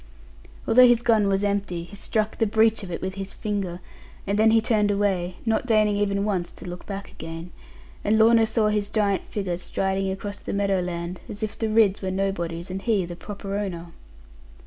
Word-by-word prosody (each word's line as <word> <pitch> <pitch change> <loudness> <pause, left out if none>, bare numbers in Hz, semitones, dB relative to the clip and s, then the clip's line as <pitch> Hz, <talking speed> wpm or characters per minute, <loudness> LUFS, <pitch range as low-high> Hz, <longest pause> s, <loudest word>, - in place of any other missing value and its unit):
Although 250 +2 +7
his 240 -1 +3
gun 220 -4 +3
was 195 0 +1
empty, 200 -4 -1
he 175 +4 -12
struck 215 +1 -1
the 225 - +3
breech 220 +1 +3
of 195 - -7
it 170 - -5
with 190 0 -2
his 195 0 -6
finger; 195 -4 -3 0.5
and 200 +1 0
then 220 +1 +6
he 225 0 +5
turned 215 -2 +2
away, 195 -3 0
not 225 +2 0
deigning 215 -3 +3
even 200 -1 0
once 185 -5 -1
to - - -10
look 175 0 -8
back 200 -1 -6
again; 165 +2 -8 0.5
and 215 +2 +3
Lorna 225 0 +5
saw 220 -1 +2
his 210 -1 0
giant 205 -3 +1
figure 185 -4 -3
striding 190 +1 -1
across 200 +1 -5
the - - -6
meadow 200 -1 +1
land, 175 0 -4
as 205 +2 -6
if 215 - -3
the 225 - -2
Ridds 215 -3 +3
were 190 - -2
nobodies, 180 -2 -2
and 190 +1 -4
he 205 -4 +1
the 175 0 -7
proper 200 +1 -6
owner. 175 -4 -4
200 Hz, 200 wpm, -25 LUFS, 185-215 Hz, 0.5 s, Although